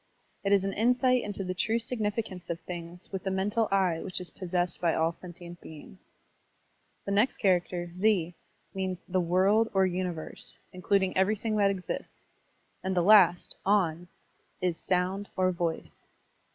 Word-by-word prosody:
It 200 Hz, -, 0 dB
is 200 Hz, -1 st, +4 dB
an 195 Hz, 0 st, -2 dB
insight 250 Hz, +3 st, +3 dB
into 205 Hz, -2 st, -4 dB
the 185 Hz, 0 st, -3 dB
true 220 Hz, +5 st, 0 dB
signifi 225 Hz, -2 st, -2 dB
cance 180 Hz, -2 st, -10 dB
of 170 Hz, -1 st, -3 dB
things 175 Hz, 0 st, -7 dB
with 190 Hz, -2 st, -4 dB
the 190 Hz, -, -1 dB
mental 205 Hz, +4 st, 0 dB
eye 185 Hz, -4 st, +2 dB
which 185 Hz, -, -4 dB
is 180 Hz, -, -2 dB
possessed 180 Hz, -1 st, -2 dB
by 170 Hz, -2 st, +2 dB
all 160 Hz, +1 st, +2 dB
sentient 175 Hz, 0 st, -11 dB
beings. 160 Hz, +4 st, -12 dB, 1.1 s
The 200 Hz, -, -3 dB
next 210 Hz, +6 st, +2 dB
char 185 Hz, -4 st, +4 dB
acter, 175 Hz, -1 st, -6 dB
ze, 180 Hz, -3 st, +1 dB, 0.4 s
means 190 Hz, -2 st, -3 dB
the 185 Hz, 0 st, +1 dB
"world" 195 Hz, +6 st, +3 dB
or 190 Hz, 0 st, +5 dB
"universe," 180 Hz, -3 st, -4 dB, 0.2 s
including 190 Hz, +1 st, +1 dB
everything 215 Hz, +3 st, +1 dB
that 200 Hz, -1 st, +4 dB
exists; 190 Hz, -2 st, -5 dB, 0.6 s
and 190 Hz, 0 st, -1 dB
the 175 Hz, -, +4 dB
last, 185 Hz, -3 st, +5 dB
on, 180 Hz, -4 st, +1 dB, 0.5 s
is 180 Hz, -2 st, 0 dB
"sotmd" 185 Hz, +2 st, 0 dB
or 185 Hz, 0 st, +3 dB
"voice." 165 Hz, -, -4 dB
185 Hz, 160 wpm, -29 LUFS, 175-200 Hz, 1.1 s, or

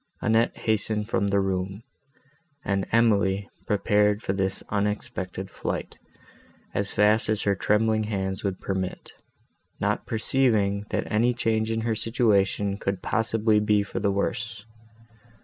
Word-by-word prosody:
Annette 115 Hz, +1 st, +2 dB
hastened 110 Hz, -1 st, +1 dB
from 100 Hz, -3 st, 0 dB
the 100 Hz, 0 st, +2 dB
room; 95 Hz, +2 st, -2 dB, 0.8 s
and 100 Hz, -1 st, 0 dB
Emily 100 Hz, -4 st, +2 dB, 0.2 s
prepared 105 Hz, +1 st, +2 dB
for 95 Hz, -, -1 dB
this 95 Hz, 0 st, -1 dB
unexpected 100 Hz, -2 st, -3 dB
flight, -, -, -4 dB, 0.7 s
as 100 Hz, +1 st, -1 dB
fast 105 Hz, +1 st, +3 dB
as 110 Hz, -1 st, +2 dB
her 100 Hz, -, +2 dB
trembling 110 Hz, +3 st, +1 dB
hands 95 Hz, -2 st, -3 dB
would 95 Hz, -2 st, -2 dB
permit, 95 Hz, -1 st, -4 dB, 0.7 s
not -, -, -1 dB
perceiving, 110 Hz, -4 st, +1 dB
that -, -, -1 dB
any 115 Hz, +3 st, +3 dB
change 110 Hz, -2 st, 0 dB
in 115 Hz, 0 st, -1 dB
her 115 Hz, 0 st, 0 dB
situation 105 Hz, -3 st, +1 dB
could 100 Hz, -2 st, -3 dB
possibly 110 Hz, -1 st, +2 dB
be 105 Hz, -1 st, +2 dB
for 100 Hz, -, -5 dB
the 100 Hz, -, +1 dB
worse. 105 Hz, +2 st, -3 dB
105 Hz, 130 wpm, -26 LUFS, 100-110 Hz, 0.8 s, fast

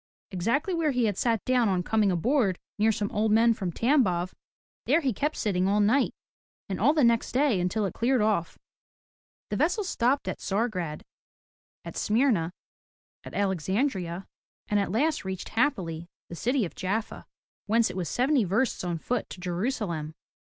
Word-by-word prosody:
Exactly 230 Hz, -, 0 dB
where 330 Hz, -3 st, +1 dB
he 250 Hz, -4 st, +1 dB
had 205 Hz, -3 st, 0 dB
sat 230 Hz, 0 st, 0 dB
down 250 Hz, -4 st, +3 dB
on 180 Hz, -2 st, 0 dB
coming 215 Hz, -2 st, +2 dB
aboard, 195 Hz, -, +1 dB, 0.2 s
near 220 Hz, +1 st, +4 dB
some 205 Hz, -2 st, -2 dB
old 215 Hz, +1 st, +1 dB
men 230 Hz, +2 st, +5 dB
from 190 Hz, -5 st, -3 dB
Tambof, 185 Hz, -, +1 dB, 0.5 s
there 335 Hz, -, +4 dB
he 265 Hz, -5 st, 0 dB
kept 295 Hz, +9 st, -1 dB
sitting 190 Hz, -4 st, 0 dB
all 205 Hz, +2 st, +2 dB
night, 230 Hz, +7 st, +2 dB, 0.5 s
and 190 Hz, -, -4 dB
all 265 Hz, +7 st, +5 dB
the 305 Hz, -2 st, +2 dB
next 235 Hz, -1 st, +2 dB
day 260 Hz, -6 st, +3 dB
until 190 Hz, +4 st, 0 dB
it 190 Hz, -, -3 dB
cleared 250 Hz, +2 st, +1 dB
off. 210 Hz, -6 st, 0 dB, 0.9 s
The -, -, 0 dB
vessel 360 Hz, +7 st, +1 dB
stopped 275 Hz, -6 st, 0 dB
at -, -, -3 dB
Tsar 215 Hz, +5 st, 0 dB
grad, 170 Hz, -7 st, -5 dB, 0.8 s
at -, -, -7 dB
Smyrna, 215 Hz, -7 st, +2 dB, 0.7 s
and -, -, -9 dB
Alexandria, 190 Hz, -, -1 dB, 0.4 s
and 210 Hz, -, +2 dB
at 200 Hz, -, -1 dB
last 300 Hz, +9 st, +1 dB
reached 190 Hz, -1 st, -5 dB
happily, 175 Hz, -, -1 dB, 0.2 s
the 170 Hz, -, -7 dB
city 245 Hz, +5 st, 0 dB
of 170 Hz, -, -8 dB
Jaffa, 205 Hz, +4 st, -3 dB, 0.4 s
whence 230 Hz, +2 st, +3 dB
it -, -, -10 dB
was 180 Hz, -3 st, -3 dB
seventy 260 Hz, 0 st, +2 dB
versts 205 Hz, +7 st, 0 dB
on 175 Hz, -2 st, -2 dB
foot 240 Hz, +7 st, -2 dB
to -, -, -9 dB
Jerusalem. 180 Hz, -, -3 dB
215 Hz, 170 wpm, -27 LUFS, 185-250 Hz, 0.9 s, men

